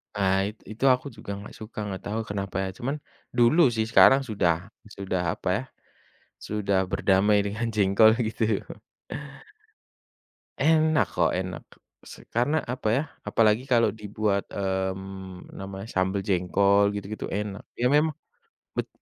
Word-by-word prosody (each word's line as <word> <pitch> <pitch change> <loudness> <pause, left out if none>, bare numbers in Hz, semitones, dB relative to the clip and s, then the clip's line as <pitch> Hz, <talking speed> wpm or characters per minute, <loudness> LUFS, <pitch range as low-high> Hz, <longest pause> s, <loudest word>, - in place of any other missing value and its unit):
Pahit 100 +1 +1
itu 110 +4 -8
aku 130 +1 +3
juga 110 -2 -8
nggak 100 - -10
suka 110 0 -8
nggak 95 -2 -5
tahu 110 +2 -1
kenapa 100 -2 -3
ya - - -3
cuman, 135 +4 -2 0.4
dulu 120 +8 +5
sih 110 -2 -1
sekarang 135 +4 +6
sudah 95 -5 +2 0.4
sudah 95 -2 -2 0.2
apa - - -8
ya, 120 - -4 0.7
sudah 100 -2 -1
berdamai 100 +2 +3
dengan 105 +3 -2
jengkol 105 +2 +5 0.2
gitu. 110 -2 0 2.0
Enak 155 +1 +3
kok - - +2
enak 90 -2 -5 0.4
se - - -13
karena 125 +7 +2
apa 125 -2 -4
ya 135 - +2 0.3
apalagi 110 +1 +3
kalau 120 -3 +4
dibuat, 105 -1 -1
mmm, 95 -1 -4
namanya 95 +1 -7
sambel 95 +1 +1
jengkol 100 +2 +2
gitu-gitu 100 +1 -5
enak 105 0 -4
ya 120 - -1
memang, 150 +1 +3 0.6
bet - - -1
105 Hz, 135 wpm, -26 LUFS, 95-115 Hz, 2.0 s, sekarang